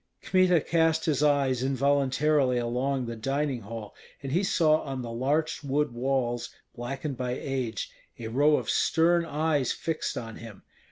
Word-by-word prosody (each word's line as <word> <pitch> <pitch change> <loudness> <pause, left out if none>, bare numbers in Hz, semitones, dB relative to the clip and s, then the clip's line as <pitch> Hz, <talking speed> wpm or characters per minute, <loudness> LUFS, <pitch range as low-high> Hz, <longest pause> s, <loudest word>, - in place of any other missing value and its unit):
Kmita 185 -2 +4
cast 160 0 +1
his 150 -3 +1
eyes 140 -4 +2
involuntarily 140 0 +2
along 125 +2 -1
the 115 0 -5
dining 135 +2 -1
hall, 110 0 -8 0.3
and 135 - -4
he 175 +6 +2
saw 155 -4 +3
on 135 -3 -5
the 115 - -6
larch 145 +7 -1
wood 145 0 0
walls, 120 -1 -1 0.3
blackened 135 +3 -4
by 125 -1 -2
age, 125 -5 -3 0.3
a 115 - -6
row 145 +5 +4
of - - -4
stern 170 +1 +3
eyes 150 -3 0
fixed 160 -1 -3
on 115 -2 -6
him. 110 -3 -11
135 Hz, 155 wpm, -27 LUFS, 120-150 Hz, 0.3 s, Kmita